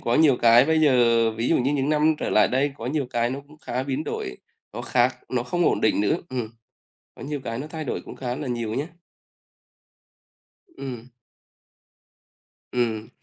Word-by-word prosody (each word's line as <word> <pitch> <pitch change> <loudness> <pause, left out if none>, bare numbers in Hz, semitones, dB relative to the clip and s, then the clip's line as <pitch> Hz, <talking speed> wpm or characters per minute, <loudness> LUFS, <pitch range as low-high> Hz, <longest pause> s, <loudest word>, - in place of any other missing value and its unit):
có 120 - 0
nhiều 150 -5 +5
cái 120 +2 +6
bây 160 +1 +2
giờ 120 -5 +4
ví 115 +2 -2
dụ - - +4
như 135 +3 +1
những 140 0 0
năm 155 +1 +3
trở - - -2
lại 105 - +4
đây 135 +2 +1
có - - -6
nhiều 140 -1 -1
cái 120 0 0
nó 135 +2 -4
cũng 150 0 -17
khá 125 -3 -3
biến 140 +3 -3
đổi, 65 - -4 0.4
nó - - -6
khác, 125 0 +2
nó 125 -2 -1
không 175 +7 -1
ổn - - +2
định 110 - +2
nữa, 105 +10 +2
ừm, 125 -4 -3 0.7
có - - -11
nhiều 145 0 -4
cái 115 +1 -3
nó 145 - -5
thay 155 -1 -6
đổi - - -3
cũng - - -10
khá 125 -1 -3
là 150 -2 -5
nhiều 115 -2 -2
nhá. 145 +4 -2 1.8
Ừm. 130 - -8 1.6
Ừm. 115 -3 -1
130 Hz, 190 wpm, -24 LUFS, 120-145 Hz, 1.8 s, cái